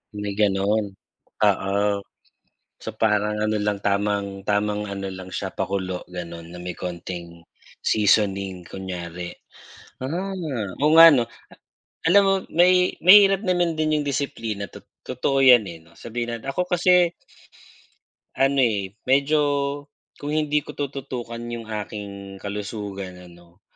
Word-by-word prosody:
May 105 -1 -4
ganon, 100 0 +1 0.5
oo. 95 +1 +2 1.0
So 110 - -7
parang 105 -1 +1
ano 110 0 0
lang 105 -1 -1
tamang 100 -1 -1
tamang 105 0 0
ano 100 -1 -5
lang 95 -1 -9
siya - - -3
pakulo 95 -1 -3
ganun. 85 -1 -7
Na 90 - -9
may 90 0 -6
konting 85 -1 -7 0.4
seasoning 100 -3 +1
kunyari. 90 -2 -6 0.7
Ah, 185 +8 -3 0.5
oo 150 - +4
nga 165 - +12
no, 120 - +3 0.9
alam 200 +2 +7
mo 195 - +4 0.2
may 180 +2 +4
mahirap 195 +1 +7
naman 175 -3 +1
din 155 -1 +1
yung - - -5
disiplina 115 -8 -3
tot - - -14 0.2
totoo 130 +2 -1
yan 125 -4 +8
eh 85 - -8
no, 85 - -21
sabihin 120 +3 -5
natin. 115 +4 -6
Ako 180 +6 -1
kasi 180 -1 +3 1.2
Ano 135 0 +2
eh 100 -6 +1 0.2
medyo 140 +3 +3 0.8
kung 145 +1 -4
hindi 150 -1 +1
ko - - -8
tututukan 130 -4 -5 0.2
yung 115 -1 -7
aking 100 -2 -7
kalusugan 100 -2 -5 0.2
ano, 85 +2 -20
105 Hz, 130 wpm, -23 LUFS, 95-140 Hz, 1.2 s, nga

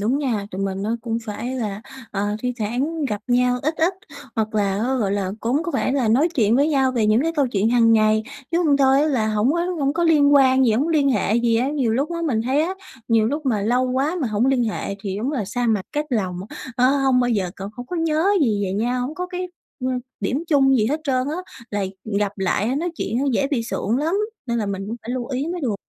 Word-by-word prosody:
đúng 235 +7 +1
nha, 230 -8 -1
tụi 190 +2 -4
mình 195 0 -2
nó 225 +3 -1
cũng 230 -1 -2
phải 230 +4 -4
là, 210 -3 -4 0.3
ờ, 205 +1 -1
thi 250 0 -1
thoảng 270 +9 -1
gặp 210 -5 -2
nhau 250 0 +2
ít 310 +3 0
ít, 345 +4 +2 0.4
hoặc 215 0 -1
là 200 -2 +1
á, 250 +5 0
gọi 205 -6 0
là, 195 -2 -1
cũng 260 +8 0
có 350 - -3
vẻ - - +1
là 260 -5 +1
nói 270 +9 +4
chuyện 225 -4 +3
với 285 +3 +3
nhau 270 -3 +2
về 230 -4 +1
những 215 +5 +3
cái 330 +1 0
câu 280 -3 +3
chuyện 220 -1 0
hàng 230 -2 +4
ngày, 215 0 +3 0.3
chứ 340 - +1
hông 285 -2 +4
thôi 270 0 +4
á - - +2
là 225 -6 +1
hổng 215 +5 +2
có 340 - 0 0.2
hổng 275 0 +1
có 340 +2 0
liên 290 -3 +5
quan 265 -1 +5
gì, 225 - +3
hổng 250 +6 +2
có 330 - -1
liên 285 -3 +3
hệ 210 -3 +1
gì 235 -1 +2
á. 250 +4 +1
Nhiều 265 -7 0
lúc 275 +7 0
á 335 - -3
mình 225 -6 0
thấy 265 +5 +1
á 360 +4 -2 0.3
nhiều 225 -1 +3
lúc 290 +3 -2
mà 220 -5 +1
lâu 250 +4 +1
quá 275 +7 0
mà 265 - 0
hổng 215 +4 +1
liên 260 -3 +2
hệ 210 -2 -3
thì 195 -1 -3
đúng 260 +7 -2
là 235 -8 -1
xa 245 +4 -2
mặt 215 -4 +1
cách 300 0 -1
lòng, 190 -7 -1 0.4
ờ, 250 - +3
hông 265 -2 +3
bao 245 - +1
giờ 195 -6 0
c - - -17 0.2
hông 245 0 -7
có 360 - -4
nhớ 320 0 +1 0.2
gì 210 -7 +1
về 185 - -2
nhau, 240 +5 0
hổng 300 - -6
có 360 +2 -4
cái, 360 0 -5 0.4
ơ, - - +1 0.3
điểm 285 +6 -1
chung 270 -3 +4
gì 215 -3 +2
hết 300 +5 -1
trơn 255 -2 0
á, 310 - -2 0.3
là 205 -1 -1 0.3
gặp 205 -1 0
lại 205 +6 0
nói 345 +4 -1
chuyện 225 +4 -2
nó 275 - 0
dễ 275 +4 +1
bị 275 -6 0
sượng 230 0 -1
lắm 320 +6 0 0.3
nên 235 0 -1
là 215 - -1
mình 195 0 -4
cũng 230 +3 -4
phải 235 - -6
lưu 245 -2 -3
ý 270 +3 -2
mới 355 - -4
được. 245 -8 -1
245 Hz, 265 wpm, -22 LUFS, 215-280 Hz, 0.4 s, liên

